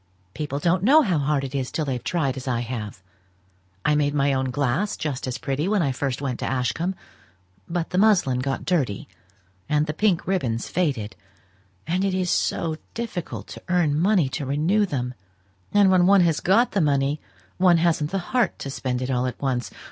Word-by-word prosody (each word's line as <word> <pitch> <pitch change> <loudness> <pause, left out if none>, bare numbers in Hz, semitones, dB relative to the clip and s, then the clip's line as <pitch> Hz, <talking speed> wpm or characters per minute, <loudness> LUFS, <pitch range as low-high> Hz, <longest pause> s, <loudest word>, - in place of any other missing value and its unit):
People 145 -2 -3
don't 170 +4 +1
know 290 +10 +6
how 180 - +1
hard 140 0 0
it 135 0 -5
is 130 -2 -2
till 155 - -1
they've 125 -4 -3
tried 140 -7 0
as 130 0 -7
I 120 -2 0
have. 110 -5 -6 0.8
I 150 - +4
made 145 -1 +1
my 140 -1 +2
own 130 0 0
glass 145 +9 0
just 140 -4 -3
as 130 0 -3
pretty 140 +6 -2
when 205 -3 +2
I 140 - +1
first 135 +1 -3
went 130 -3 -2
to - - -2
Ashcombe; 130 +9 -1 0.7
but 170 -1 -2
the 180 - +1
muslin 190 -12 +3
got 135 +1 -2
dirty, 140 - 0 0.6
and 150 0 +2
the 150 - -3
pink 190 -1 +1
ribbons 125 -12 -1
faded, 135 -12 -1 0.7
and 180 +4 0
it 195 -1 0
is 185 -2 0
so 160 -2 0 0.2
difficult 225 -7 -5
to - - -9
earn 175 -5 +2
money 185 -4 +3
to 145 - -4
renew 170 +10 +2
them; 125 -5 -3 0.6
and 200 -2 +5
when 180 -1 +4
one 200 -1 +6
has 165 -4 +2
got 225 +7 +3
the 200 - +1
money 145 0 +1 0.4
one 180 -2 +5
hasn't 160 -3 +1
the 190 -1 -4
heart 250 -3 +2
to 140 - -6
spend 130 -2 -2
it 130 - -2
all 125 0 +1
at 125 - -6
once. 130 -3 -1
150 Hz, 195 wpm, -24 LUFS, 130-180 Hz, 0.8 s, know